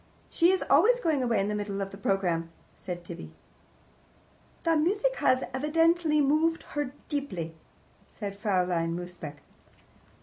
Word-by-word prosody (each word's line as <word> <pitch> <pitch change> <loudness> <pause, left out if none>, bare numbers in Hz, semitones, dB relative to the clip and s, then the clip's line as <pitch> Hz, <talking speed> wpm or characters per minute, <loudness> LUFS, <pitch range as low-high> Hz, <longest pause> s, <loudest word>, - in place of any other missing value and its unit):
"She 340 0 +4
is 375 0 +2
always - - +5
going 315 - +1
away 235 -4 +1
in 195 - +1
the 210 - -1
middle 205 -1 -3
of 195 0 -4
a - - -8
programme," 180 -4 0 0.3
said 175 -2 -6
Tibby. 80 -1 -8 1.3
"The 330 -1 +3
music 410 +11 +1
has 255 0 +3
evidently 315 +2 +3
moved 310 +4 +2
her 290 -2 -3
deeply," 190 - -3 0.6
said 200 -3 -6
Fraulein 180 -5 0
Mosebach. 175 -5 -7
230 Hz, 135 wpm, -28 LUFS, -, 1.3 s, always